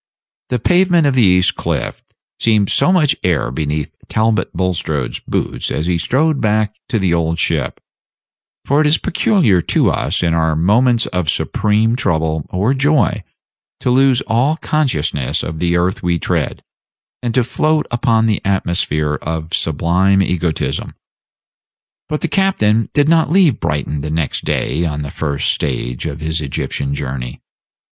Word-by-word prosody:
The 125 - 0
pavement 175 - +3
of 140 - +2
the 130 - +3
East 90 -3 +4
Cliff - - -3 0.4
seemed 105 -3 +2
so - - +3
much 160 -7 +3
air 85 -8 0
beneath 75 +2 -3
Talbot 110 0 0
Bulstrode's 80 -7 -2
boots - - -3
as 75 - -2
he 85 -1 0
strode 145 - +1
back 110 -1 +1
to 120 - 0
the 95 -4 +1
Old 85 -1 0
Ship; 80 -4 -1 0.9
for 145 +3 +2
it 155 - +3
is 150 - +4
peculiar 160 - +2
to - - +1
us, 85 +6 -1
in 85 -1 +1
our 80 -1 +1
moments 115 +8 +3
of 90 -4 -2
supreme 110 +7 +1
trouble 80 - -1
or 100 +8 0
joy, 140 -6 +1 0.6
to 125 - 0
lose 130 0 +3
all 130 +7 +1
consciousness 85 - -1
of 80 0 -5
the 85 0 +1
earth 90 +2 0
we 85 -1 0
tread, - - -2 0.6
and 120 -2 -3
to 130 - +3
float 155 +5 0
upon 115 -2 +2
the 110 -2 0
atmosphere 85 -6 -1
of 80 +1 -5
sublime 90 +5 +2
egotism. 85 -3 -2 1.1
But 150 -1 -2
the - - 0
captain 115 - +1
did 145 0 +3
not 160 -2 +3
leave 170 - +3
Brighton 75 -3 -2
the 75 - -4
next 80 -2 -2
day 80 +4 -1
on 75 -3 -2
the 70 - -6
first 70 -3 -1
stage 60 0 -3
of 75 0 -6
his 80 0 -1
Egyptian 70 -1 -2
journey. 65 -3 -5
90 Hz, 155 wpm, -17 LUFS, 80-125 Hz, 1.1 s, East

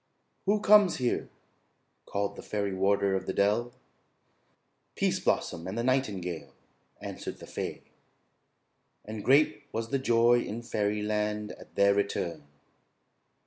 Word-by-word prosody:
"Who 205 +1 +3
comes 205 -3 +6
here?" 125 -2 -1 0.8
called 100 0 -2
the - - -8
fairy 100 -2 -2
warder 100 +1 +2
of 95 0 -2
the - - -1
dell. 105 +5 +2 1.2
"Pease - - +1
Blossom 85 -1 -1
and 95 +4 -4
the 115 - 0
nightingale," 100 -10 -1 0.4
answered - - -6
the - - -11
fay; - - -5 1.2
and 110 -1 -6
great 135 -5 +3
was 115 0 -3
the 135 - 0
joy 120 -1 +4
in 115 +2 -5
fairyland 105 -1 -1
at - - -14
their 100 0 +5
return. 85 -7 -2
105 Hz, 125 wpm, -29 LUFS, 100-120 Hz, 1.2 s, comes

